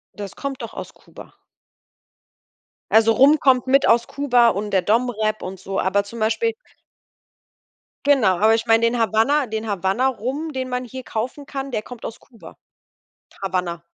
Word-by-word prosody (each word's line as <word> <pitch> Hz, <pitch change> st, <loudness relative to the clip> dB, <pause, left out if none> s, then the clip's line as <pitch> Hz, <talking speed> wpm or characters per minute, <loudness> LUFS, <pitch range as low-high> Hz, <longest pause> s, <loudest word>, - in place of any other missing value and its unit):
Das 200 Hz, -2 st, -8 dB
kommt 275 Hz, -1 st, -5 dB
doch 230 Hz, -, -7 dB
aus -, -, -8 dB
Kuba. -, -, -15 dB, 1.6 s
Also, 225 Hz, +1 st, +5 dB
Rum 280 Hz, +7 st, +5 dB
kommt 260 Hz, -2 st, +3 dB
mit 275 Hz, +1 st, +4 dB
aus 235 Hz, 0 st, +3 dB
Kuba 250 Hz, -4 st, +3 dB
und 210 Hz, -1 st, -3 dB
der 190 Hz, -2 st, +2 dB
DomRep 220 Hz, -1 st, 0 dB
und 185 Hz, 0 st, -7 dB
so, 195 Hz, 0 st, -4 dB
aber 200 Hz, +2 st, +1 dB
zum 230 Hz, +3 st, -10 dB
Beispiel 445 Hz, -, 0 dB, 1.5 s
Genau, 215 Hz, -11 st, +4 dB
aber 220 Hz, +3 st, +4 dB
ich 225 Hz, +1 st, -1 dB
meine, 225 Hz, +1 st, +4 dB
den 235 Hz, +1 st, 0 dB
Havana 230 Hz, +6 st, +2 dB
den 220 Hz, 0 st, -4 dB
Havana 200 Hz, +6 st, 0 dB
Rum, 270 Hz, +7 st, -4 dB
den 260 Hz, -1 st, -4 dB
man 250 Hz, 0 st, -3 dB
hier 260 Hz, +1 st, -8 dB
kaufen 255 Hz, +6 st, -5 dB
kann, 270 Hz, 0 st, -5 dB
der 215 Hz, -, -2 dB
kommt 245 Hz, 0 st, -11 dB
aus 225 Hz, -, -7 dB
Kuba. 230 Hz, -4 st, -16 dB, 0.9 s
Havana. 180 Hz, -3 st, -2 dB
230 Hz, 165 wpm, -21 LUFS, 210-260 Hz, 1.6 s, Also